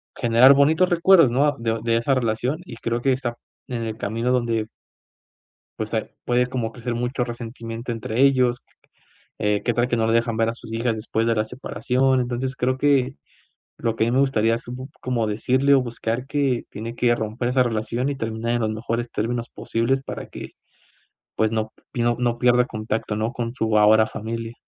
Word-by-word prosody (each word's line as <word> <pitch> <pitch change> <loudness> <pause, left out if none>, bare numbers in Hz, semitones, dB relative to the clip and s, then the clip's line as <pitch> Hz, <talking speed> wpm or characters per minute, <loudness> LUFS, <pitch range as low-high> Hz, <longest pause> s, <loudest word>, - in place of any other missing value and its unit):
generar 120 +3 +6
bonitos 160 +6 +4
recuerdos, 175 -4 +6
¿no? 135 +5 +3
A 145 -2 +1
de 115 -1 -1
de 115 0 +1
esa 120 +4 +2
relación, 125 +4 -1
y 120 - -9
creo 115 +1 -2
que 135 +2 +2
está 125 -2 -3 0.3
en 120 -2 -3
el 110 -1 -4
camino 115 +4 -2
donde 115 -3 +1 1.1
pues, - - -4
eh, - - -2
puede 125 0 +2
como 120 -3 -3
crecer 120 0 -4
mucho 125 +1 -1
resentimiento 115 0 -6
entre 115 +1 -3
ellos, 130 -3 +4 0.8
eh, 105 0 +1
¿qué 120 - +1
tal 120 +2 +1
que 120 - 0
no 110 - +1
lo 115 - +1
dejan 115 -1 +1
ver 115 0 +2
a 115 - -4
sus 115 - -12
hijas 115 0 0
después 110 +1 -1
de 115 - +2
la 110 - +1
separación? 130 +3 0
Entonces 125 +2 -3
creo 130 +1 0
que, 135 -2 +2 0.6
lo 115 -1 -1
que 110 - +2
a - - -1
mí - - -2
me 130 - +3
gustaría 115 -5 +2
así 120 +1 -7
p 125 +1 -6 0.2
como 120 -3 -1
decirle 130 +6 +2
o 135 - +4
buscar 120 +1 -3
que 140 -4 0
tiene 115 +3 -6
que 120 0 +2
romper 115 +2 -3
esa 130 0 +3
relación 120 +2 -1
y 140 - -2
terminar 115 -1 -3
en 120 - 0
los 110 - 0
mejores 115 +2 -3
términos 115 +2 -2
posibles, 115 +4 -1
para - - -6
que, - - -8 0.9
pues 110 0 +1
no 110 -1 -2 0.2
p 120 - -2
no 120 0 +1
pierda 125 0 +4
contacto, 110 -1 -3
¿no? 110 +3 -2
Con 120 -2 -3
su 110 -4 +1
ahora 110 +1 +6
familia. 115 +1 -5
120 Hz, 200 wpm, -23 LUFS, 115-125 Hz, 1.1 s, generar